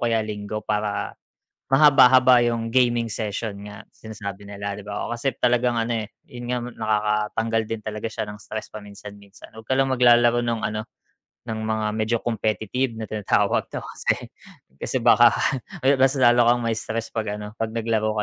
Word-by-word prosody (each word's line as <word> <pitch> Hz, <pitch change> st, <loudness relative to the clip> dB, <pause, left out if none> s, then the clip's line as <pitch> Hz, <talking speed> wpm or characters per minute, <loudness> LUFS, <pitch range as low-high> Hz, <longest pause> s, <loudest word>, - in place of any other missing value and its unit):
kaya 115 Hz, -2 st, +1 dB
Linggo 105 Hz, 0 st, -5 dB
para, 105 Hz, -1 st, -2 dB, 0.6 s
mahaba-haba 130 Hz, -3 st, +6 dB
yung 115 Hz, -1 st, -1 dB
gaming 120 Hz, -1 st, +2 dB
session 105 Hz, -1 st, -4 dB
nga, 105 Hz, +1 st, -11 dB
sinasabi 105 Hz, -2 st, -8 dB
nila, 100 Hz, 0 st, -6 dB
'di 105 Hz, -, -9 dB
ba. 105 Hz, 0 st, -5 dB
Oh, -, -, -8 dB
kasi 135 Hz, +3 st, -1 dB
talagang 120 Hz, -1 st, +2 dB
ano, 115 Hz, -1 st, -1 dB
eh 105 Hz, -, -11 dB, 0.2 s
yun 120 Hz, 0 st, -7 dB
nga, 125 Hz, -, 0 dB
nakakatanggal 110 Hz, -1 st, -1 dB
din 110 Hz, 0 st, -5 dB
talaga 105 Hz, +1 st, -5 dB
siya 105 Hz, -, -4 dB
ng 105 Hz, -, -7 dB
stress 110 Hz, +1 st, -6 dB
paminsan-minsan, 100 Hz, 0 st, -12 dB
wag 110 Hz, -, -10 dB
ka 120 Hz, -, -6 dB
lang 135 Hz, -, +3 dB
maglalaro 120 Hz, -2 st, +4 dB
ng, 115 Hz, -1 st, -1 dB
ano, 110 Hz, 0 st, -4 dB, 0.6 s
ng 110 Hz, -2 st, -4 dB
mga 110 Hz, -1 st, -1 dB
medyo 110 Hz, +2 st, 0 dB
competitive 115 Hz, +2 st, -1 dB
na 110 Hz, -, -5 dB
tinatawag 105 Hz, -2 st, 0 dB
daw -, -, -6 dB
kasi, -, -, -2 dB, 0.6 s
kasi -, -, -3 dB
baka 120 Hz, 0 st, +6 dB, 0.5 s
ayun 135 Hz, 0 st, +3 dB
mas 135 Hz, +1 st, +4 dB
lalo 120 Hz, -2 st, +5 dB
kang 120 Hz, 0 st, +2 dB
ma-stress 115 Hz, 0 st, -3 dB
pag 105 Hz, -2 st, -3 dB
ano, 105 Hz, 0 st, -8 dB
pag 115 Hz, -, 0 dB
naglaro 110 Hz, -1 st, 0 dB
110 Hz, 170 wpm, -23 LUFS, 105-120 Hz, 0.6 s, mahaba-haba